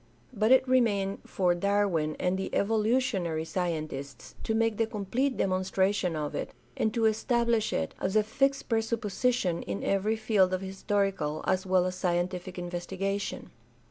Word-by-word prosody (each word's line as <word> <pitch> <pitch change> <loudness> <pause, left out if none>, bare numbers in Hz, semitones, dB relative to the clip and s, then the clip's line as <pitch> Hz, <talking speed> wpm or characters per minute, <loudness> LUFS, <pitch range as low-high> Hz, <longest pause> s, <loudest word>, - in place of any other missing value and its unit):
But 215 +1 +2
it 260 0 +6
remained 205 -6 +2
for 180 -2 +2
Darwin 175 -5 +1
and 180 +1 +1
the 190 0 -3
evolutionary 210 -6 +1
scientists 155 -6 -4
to 220 - 0
make 225 -1 +1
the 225 - +1
complete 230 +5 -1
demonstration 190 -1 +1
of 150 -1 -3
it, - - -4 0.2
and 220 - +1
to 230 -1 +2
establish 235 0 +1
it 80 - -2
as 190 +2 -1
a 215 - +5
fixed 275 +6 0
presupposition 225 -3 0
in 100 0 -4
every 200 +3 +1
Held 205 -4 +2
of 185 - -5
historical 195 -5 -1
as 185 0 0
well 185 -1 +3
as 185 - -1
scientific 180 0 -2
investigation. 185 +3 -3
195 Hz, 145 wpm, -29 LUFS, 180-220 Hz, 0.2 s, it